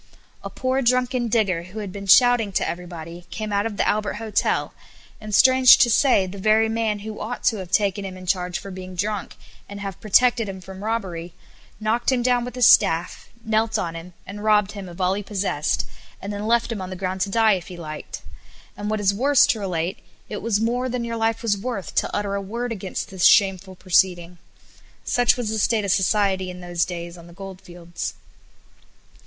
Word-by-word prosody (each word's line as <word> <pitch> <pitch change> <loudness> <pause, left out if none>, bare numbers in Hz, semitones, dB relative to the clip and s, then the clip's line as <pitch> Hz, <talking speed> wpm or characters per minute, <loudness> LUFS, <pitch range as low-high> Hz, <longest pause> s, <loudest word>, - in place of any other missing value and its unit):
A - - -5
poor 260 +1 -1
drunken 250 0 +1
digger, 210 -7 +1
who 185 +5 -12
had 205 -3 -5
been 200 +1 -8
shouting 245 0 +5
to - - 0
everybody, 170 0 -7
came 215 +2 -5
out 200 +2 +1
of 210 -3 -7
the - - +1
Albert 210 -1 0
Hotel 215 -1 -1 0.5
and, 215 0 -7
strange 260 +1 +7
to 240 -3 +4
say, 235 -5 +4
the 190 +2 -8
very 215 +2 +3
man 220 -2 -1
who 215 -1 -6
ought 230 +4 -5
to 225 - +2
have 185 -3 -7
taken 200 -1 +1
him 190 -1 -7
in 185 - -10
charge 180 -1 -1
for 195 - -9
being 185 0 -8
drunk, 205 +2 -3 0.3
and 200 0 -8
have 195 -3 -7
protected 230 +1 +3
him 190 -1 -7
from 190 +1 -10
robbery, 185 -7 -3 0.5
knocked 225 +4 0
him 250 -2 +1
down 245 -1 +2
with 245 +1 -7
his 250 -2 +3
staff, 165 -2 +3 0.2
knelt 220 0 +1
on 165 -1 -3
him, 170 +2 -9
and 205 +2 -8
robbed 210 -2 +3
him 200 -3 -8
of 175 - -12
all 185 0 +2
he 200 - -3
possessed, 195 -7 -1 0.3
and 200 +1 -6
then 205 +1 -4
left 235 +1 +2
him 215 -4 -4
on 185 - -6
the 185 - -6
ground 185 0 -3
to 200 - 0
die 220 +1 +4
if 185 -3 -4
he 180 - -9
liked, 155 -2 -8 0.5
and, 205 0 -5
what 215 0 -1
is 200 -1 +2
worse 280 +6 +4
to 265 -6 0
relate, 180 -2 -3 0.3
it 210 - -5
was 215 -2 0
more 245 +3 0
than 250 -1 -2
your 230 0 -4
life 225 0 -1
was 215 -3 +2
worth 200 -4 -5
to - - 0
utter 205 -1 -2
a 200 - -2
word 235 +5 -4
against 195 -4 -5
this 190 -2 -4
shameful 190 -2 +3
proceeding. 180 -1 +1 0.7
Such 245 0 +3
was 240 -3 -3
the 220 - -1
state 215 0 +1
of 195 - +1
society 190 -1 +1
in 180 0 -8
those 175 -2 -1
days 170 -1 -7
on 170 - -13
the 170 - -14
goldfields. 175 -2 -8
200 Hz, 210 wpm, -23 LUFS, 185-225 Hz, 0.7 s, strange